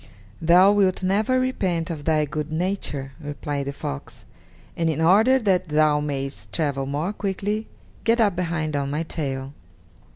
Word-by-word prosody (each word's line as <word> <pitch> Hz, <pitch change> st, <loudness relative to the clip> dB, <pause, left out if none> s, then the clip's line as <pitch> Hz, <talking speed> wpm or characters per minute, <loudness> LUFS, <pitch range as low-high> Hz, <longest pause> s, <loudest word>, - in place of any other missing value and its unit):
"Thou 180 Hz, +4 st, +6 dB
wilt 195 Hz, -2 st, +2 dB
never 210 Hz, +7 st, +2 dB
repent 185 Hz, -10 st, -1 dB
of 150 Hz, -3 st, -6 dB
thy 155 Hz, -2 st, +2 dB
good 150 Hz, +1 st, -4 dB
nature," 155 Hz, -6 st, -2 dB
replied 145 Hz, -1 st, -4 dB
the -, -, -1 dB
fox, 70 Hz, -, -7 dB, 0.5 s
"and 165 Hz, -1 st, 0 dB
in 160 Hz, -, -1 dB
order 210 Hz, +11 st, +5 dB
that 190 Hz, -7 st, +1 dB
thou 150 Hz, -1 st, +3 dB
mayest 140 Hz, -2 st, -4 dB
travel 140 Hz, -4 st, -1 dB
more 150 Hz, +8 st, -2 dB
quickly, 205 Hz, +2 st, -2 dB, 0.4 s
get 230 Hz, +1 st, +3 dB
up 205 Hz, -5 st, +3 dB
behind 165 Hz, -4 st, -2 dB
on 140 Hz, -1 st, -1 dB
my 150 Hz, +3 st, -1 dB
tail." 135 Hz, -4 st, -4 dB
160 Hz, 155 wpm, -24 LUFS, 145-195 Hz, 0.5 s, Thou